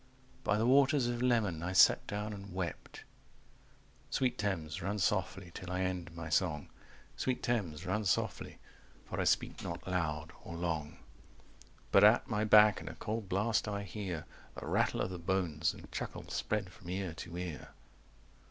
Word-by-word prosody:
By 105 - +2
the 110 - +2
waters 135 +1 +5
of 120 0 -1
Leman 110 -10 +2
I 90 +2 -2
sat 95 - +6
down 105 +1 -3
and 100 -2 -9
wept... 90 -3 -5 1.1
Sweet 130 -2 +1
Thames, 85 -7 -2
run 100 +2 -1
softly 95 -2 0
till 90 0 -7
I 90 0 -1
end 90 -2 -2
my 85 -1 -5
song, 80 -3 0 0.5
Sweet 130 -1 -1
Thames, 95 -9 -1
run 105 +4 -1
softly, 95 - -1 0.5
for - - -4
I - - 0
speak - - +1
not 85 +1 -6
loud 80 -4 -1
or 85 - -7
long. 80 -3 -2 0.9
But - - +7
at - - +6
my 105 0 0
back 105 -3 +7
in 80 - -6
a 80 - -8
cold 105 +4 -4
blast 105 +4 +1
I 100 -1 -2
hear 95 -4 -5 0.3
The - - -7
rattle - - +1
of 95 - -1
the 90 - -5
bones, 85 -3 0
and - - -13
chuckle - - -5
spread 100 -4 -1
from 85 - -12
ear 95 -2 -2
to 85 +1 -7
ear. 90 -4 -5
95 Hz, 170 wpm, -33 LUFS, 85-105 Hz, 1.1 s, But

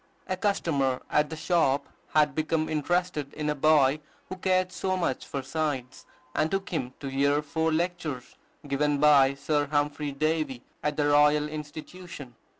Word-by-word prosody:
A 185 - -2
customer 150 -10 0
at 150 0 +2
the 160 - -5
shop 155 -4 +1 0.3
had 150 -2 +4
become 155 +1 0
interested 155 -1 -1
in 150 0 -1
a - - +1
boy 150 -1 +4 0.3
who 185 - -4
cared 185 0 +1
so 185 0 -1
much 170 -8 -2
for 140 -2 -4
science, 135 -3 -3 0.3
and 155 - +1
took 195 0 -2
him 130 -7 -3
to 140 - -5
hear 140 +2 +1
four 160 +2 0
lectures 160 -6 -2 0.3
given 145 +1 +1
by 140 -2 +5
Sir 145 +1 0
Humphry 145 0 -1
Davy 155 -3 -1 0.2
at 150 -1 -1
the 150 - +2
Royal 150 +1 +4
Institution. 155 -1 -8
150 Hz, 155 wpm, -27 LUFS, 140-160 Hz, 0.3 s, by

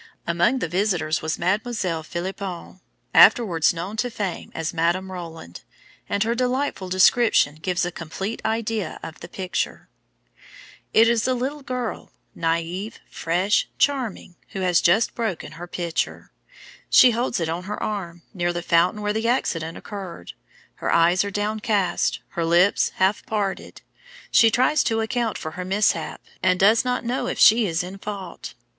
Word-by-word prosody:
Among 175 +9 +2
the 205 - -2
visitors 175 -3 0
was 160 0 -2
Mademoiselle 185 -2 -1
Philipon, 185 +2 -6 0.3
afterwards 195 -7 +6
known 175 +6 -6
to 245 +3 0
fame 200 -7 -5
as 165 0 -3
Madame 175 +3 0
Roland, 165 - -8 0.5
and 200 +1 +1
her 230 +2 0
delightful 250 -5 -1
description 185 -5 +4
gives 180 0 0
a 175 - -3
complete 190 +7 -5
idea 220 -5 -2
of 165 -1 -8
the 170 - -9
picture: 185 +1 -4 1.0
"It 225 +1 +6
is 235 0 +2
a 255 - +1
little 270 +4 -3
girl, 250 -4 -5 0.2
naïve, 170 +5 -2 0.2
fresh, 180 +6 0
charming, 250 -10 -1 0.2
who 195 - -4
has 180 -2 +3
just 190 +6 +3
broken 220 -8 -3
her 175 +2 -9
pitcher; 170 -2 -3 0.6
she 255 - +7
holds 235 -1 -1
it 165 - -1
on 170 +3 -4
her 210 +2 -4
arm, 175 -5 -4
near 175 -3 0
the 175 0 -4
fountain 175 +5 +2
where 210 0 0
the 220 +1 -1
accident 165 -9 -1
occurred. 185 - -8 0.4
Her - - -2
eyes 170 +3 +4
are 200 - -3
downcast, 205 - 0
her 170 - -3
lips 175 +4 +3
half 190 +2 +1
parted; 205 -3 -3 0.5
she 225 - +6
tries 255 +7 +3
to 225 0 +1
account 225 0 -1
for 155 - -6
her 180 +3 -6
mishap, 195 +3 0 0.2
and 185 -1 +2
does 215 +4 +5
not 250 -1 -1
know 245 +3 -1
if - - -3
she 225 0 +6
is 165 0 -1
in 190 +2 -8
fault. 195 -4 -7
190 Hz, 155 wpm, -23 LUFS, 170-220 Hz, 1.0 s, she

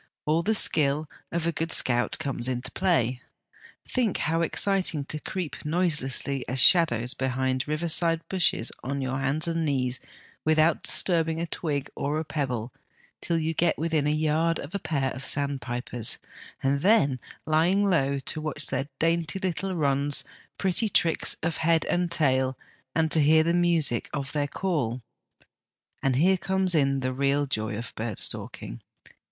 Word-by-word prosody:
All 155 +2 +2
the 220 +5 +1
skill 150 -4 +3 0.2
of 170 -1 -1
a 170 - +1
good 165 +1 -3
scout 120 -1 +1
comes 140 -5 -3
into 125 0 -3
play. 130 -10 +1 0.6
Think, 240 -6 0
how 165 +2 0
exciting 180 -3 +1
to 155 - -3
creep 180 -1 -5
noiselessly 150 -5 +1
as 130 +1 0
shadows 125 -8 +5
behind 130 0 -1
river 155 +3 -1
side 165 0 +1
bushes 175 -10 +1
on 140 +1 -3
hands 135 +5 -1
and 165 0 -1
knees 130 -4 0 0.4
without 155 +1 +3
disturbing 165 -3 +2
a 170 - -1
twig 145 -4 -3
or 145 +2 -2
a 160 - -2
pebble 125 -7 -3 0.5
till 170 - 0
you 160 0 -1
get 170 +1 +1
within 160 -2 0
a - - +2
yard 155 +2 +1
of 145 +6 -8
a 200 - -2
pair 145 -6 -1
of 130 - -7
sandpipers, 130 -5 -2 0.5
and 140 +1 +2
then, 145 - +3 0.3
lying 175 +6 +2
low, 140 -7 +2
to 135 +3 -3
watch 155 -1 -2
their 135 +1 -2
dainty 165 +2 0
little 190 0 -2
runs, 140 -2 +1 0.3
pretty 195 +3 +1
tricks 165 -4 +2
of 165 0 -1
head 165 0 +2
and 175 0 0
tail, 130 -4 +2 0.4
and 160 -1 +1
to 160 - +3
hear 160 +2 +5
the 170 +1 +1
music 170 -8 +1
of 140 -2 -4
their 145 -1 -1
call. 140 -8 -2 1.0
And 135 -2 +1
here 185 +8 +4
comes 190 0 0
in 135 -3 +2
the 130 0 -1
real 140 +2 +1
joy 110 -5 -3
of 115 - -6
bird 110 -2 -4
stalking. - - -5
155 Hz, 160 wpm, -26 LUFS, 135-165 Hz, 1.0 s, shadows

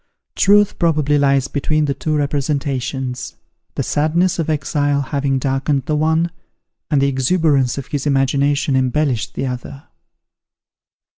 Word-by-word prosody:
Truth, 205 +1 +3
probably, 150 -4 +2
lies 140 -1 +2
between 155 +1 0
the 140 - 0
two 145 +4 -2
representations; 140 -3 -2 0.4
the - - -1
sadness 170 +5 +1
of 160 - -1
exile 145 -1 0
having 140 -1 -1
darkened 135 +1 -1
the 155 - -1
one, 160 +2 +1 0.6
and 145 - +2
the - - +3
exuberance 140 -1 +1
of 140 - -4
his 145 0 -3
imagination 140 +1 +1
embellished 130 -2 0
the - - -2
other. 130 +2 -6
140 Hz, 130 wpm, -18 LUFS, 135-155 Hz, 0.6 s, Truth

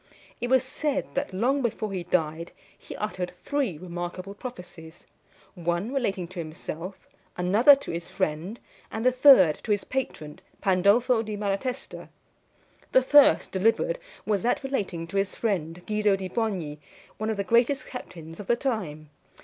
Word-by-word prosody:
It 240 - -2
was 260 0 +4
said 280 +2 -2
that, 275 -4 -2
long 250 +9 +1
before 220 -3 -2
he 180 -2 -3
died, 165 -1 -1 0.2
he - - -10
uttered 185 -4 -4
three 275 - -1
remarkable 175 +3 -6
prophecies 180 -8 -10 0.5
one 175 +7 -2
relating 195 -10 -1
to 185 -1 -8
himself, 165 +3 -7 0.3
another 210 +11 +6
to 275 - -7
his 170 +1 -5
friend, 180 +5 -2 0.3
and 220 +2 -4
the 255 - +6
third 250 - +7
to - - -10
his 205 -1 +1
patron, 155 - -4 0.2
Pandolfo 205 +6 +3
di 215 -1 -5
Malatesta. 210 +6 -3 0.8
The 260 - +5
first 290 +2 +5
delivered 225 - +1 0.3
was 205 -3 +1
that 245 +6 0
relating 200 -11 -2
to 170 +4 -5
his 195 0 0
friend 180 -5 -2
Guido 210 -1 +2
di 190 -1 -5
Bogni, 180 -9 -2 0.4
one 215 +1 -1
of 220 - -1
the 200 - 0
greatest 235 +6 +2
captains 165 -10 -9
of 205 - -8
the 240 - +4
time. 180 - -3
200 Hz, 155 wpm, -26 LUFS, 175-245 Hz, 0.8 s, third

